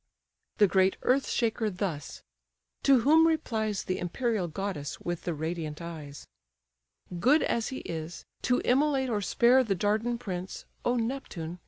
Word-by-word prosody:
The 210 - +6
great 190 0 +3
earth 265 +2 +2
shaker 225 -2 0
thus: 180 -6 -4 0.6
to 270 -3 +5
whom 320 +6 +6
replies 220 -10 -1
The 185 - -2
imperial 205 +1 -1
goddess 165 -4 -4
with 175 -1 -4
the 175 - -1
radiant 160 -1 -4
eyes: 155 -4 -8 0.9
"Good 275 - +4
as 230 -1 0
he 260 - -5
is, 160 +1 -6 0.2
to 250 - +1
immolate 265 -1 +2
or 210 -2 0
spare 245 +6 +4
The 205 -5 0
Dardan 215 +5 0
prince, 185 -4 -6 0.2
O 245 - +1
Neptune! 225 -9 -4
205 Hz, 145 wpm, -29 LUFS, 175-250 Hz, 0.9 s, The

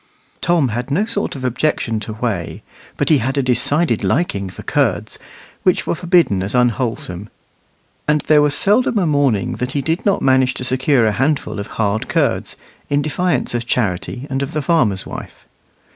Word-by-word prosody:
Tom 165 -6 +2
had 120 +4 -3
no 175 +10 +1
sort 220 -7 -3
of 130 - -7
objection 125 -3 0
to 110 +1 -6
whey, 105 -7 -3 0.3
but - - 0
he 155 -3 +5
had 135 +4 -2
a 140 - +2
decided 130 +7 +2
liking 100 - 0
for - - -10
curds, - - -1 0.4
which 185 - +2
were - - 0
forbidden 170 - +2
as 100 +5 -2
unwholesome; 115 -5 -1 0.8
and 150 0 +2
there 150 -1 +4
was 145 -1 +2
seldom 220 +6 +3
a 190 - +2
morning 140 -9 +1
that 125 +1 -3
he 140 - 0
did 165 +4 -1
not 200 - +1
manage 130 -1 +3
to - - -4
secure 130 -1 +2
a 110 - +3
handful 135 +1 -1
of 100 - -5
hard 110 0 0
curds, - - 0 0.3
in 145 0 +1
defiance 155 -3 -1
of 120 0 -3
Charity 120 +3 -1
and 135 -1 -2
of 140 +3 -4
the 150 -1 -2
farmer's 120 - +1
wife. - - -9
130 Hz, 180 wpm, -18 LUFS, 115-155 Hz, 0.8 s, he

